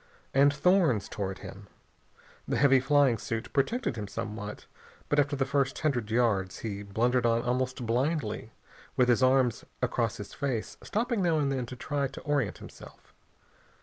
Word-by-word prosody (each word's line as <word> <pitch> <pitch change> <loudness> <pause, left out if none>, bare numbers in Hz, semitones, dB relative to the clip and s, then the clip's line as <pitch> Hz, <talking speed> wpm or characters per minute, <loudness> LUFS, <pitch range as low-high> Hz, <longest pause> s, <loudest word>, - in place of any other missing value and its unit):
And 140 +1 +5
thorns 150 - +3
tore 100 -2 -3
at 95 - -6
him. 100 +1 -10 0.8
The - - 0
heavy 135 -1 +5
flying 135 -3 +3
suit 115 +3 -4
protected 140 - 0
him 105 -2 -4
somewhat, 105 0 -6 0.4
but 145 - +3
after 145 0 +2
the 135 -1 0
first 140 0 0
hundred 125 -8 -1
yards 110 -5 +1
he 100 -2 -3
blundered 120 +5 +1
on 115 0 +2
almost 125 0 -1
blindly, 120 -2 -1 0.5
with 125 -1 +4
his 120 +1 +4
arms 130 -3 +3 0.2
across 120 -3 0
his 105 - -8
face, 130 -6 -3
stopping 230 0 -1
now 170 -3 +2
and 140 -2 +1
then 130 -3 -2
to 125 - -7
try 140 +2 -2
to 135 - -10
orient 145 -7 0
himself. - - -14
125 Hz, 165 wpm, -29 LUFS, 110-140 Hz, 0.8 s, And